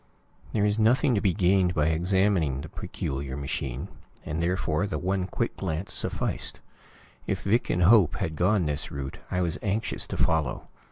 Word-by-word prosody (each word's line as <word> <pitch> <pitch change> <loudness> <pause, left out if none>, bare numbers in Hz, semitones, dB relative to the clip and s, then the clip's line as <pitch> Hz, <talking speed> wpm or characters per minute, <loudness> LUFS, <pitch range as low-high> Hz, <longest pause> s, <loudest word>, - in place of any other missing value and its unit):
There 105 - +1
was 105 +1 +2
nothing 120 +4 +4
to 105 - +1
be 100 - +3
gained 90 -1 +2
by 75 0 +2
examining 85 -4 +2
the - - -8
peculiar 65 0 -4
machine, 65 -2 -3 0.4
and 80 +2 -2
therefore 90 +1 0
the - - -3
one 95 0 -1
quick - - -2
glance 80 +5 -3
sufficed. - - -2 0.7
If - - -2
Vic 115 +5 +1
and 90 - +2
Hope 100 -3 +6
had 80 - -3
gone 90 +3 +2
this 75 -1 -2
route, 70 -1 -6
I 90 - 0
was 85 -2 -1
anxious 105 +2 -1
to - - -4
follow. 80 -5 0
90 Hz, 170 wpm, -27 LUFS, 75-100 Hz, 0.7 s, Hope